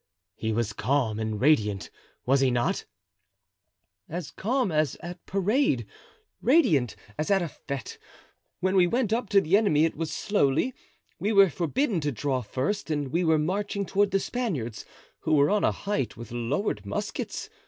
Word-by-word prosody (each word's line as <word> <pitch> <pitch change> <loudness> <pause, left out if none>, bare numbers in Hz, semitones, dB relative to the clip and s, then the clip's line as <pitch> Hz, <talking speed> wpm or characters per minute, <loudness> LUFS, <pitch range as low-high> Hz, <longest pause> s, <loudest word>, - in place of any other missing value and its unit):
"He 110 - -2
was 110 -1 -1
calm 120 -2 0
and 110 -1 -2
radiant, 105 - +2 0.3
was 135 +2 +4
he 135 -1 +3
not?" 120 -1 0 1.2
"As 160 -2 -5
calm 245 -1 0
as 155 -3 +1
at 175 +1 -8
parade, 195 - +1 0.6
radiant 180 - +3 0.2
as 155 - -1
at 195 -2 +3
a - - -2
fete. 140 -4 -7 0.6
When 190 +1 +1
we 180 -2 +5
went 230 +1 +1
up 230 -3 -1
to 200 - +6
the 170 +3 +2
enemy 180 -8 +4
it 165 - -2
was 160 0 -3
slowly; 205 - +1 0.5
we 200 +6 0
were 195 -4 +6
forbidden 195 - 0
to 145 0 0
draw 130 +2 -1
first 135 - -2
and 145 -3 -1
we 170 +6 0
were 160 -2 +4
marching 200 +5 -1
toward 200 +2 +2
the 195 - +2
Spaniards, 165 - -3 0.3
who 155 - +1
were 145 +4 +4
on 210 0 +2
a - - +4
height 150 - -3
with 115 0 -9
lowered 120 - -1
muskets. 100 -1 -4
155 Hz, 165 wpm, -27 LUFS, 130-200 Hz, 1.2 s, to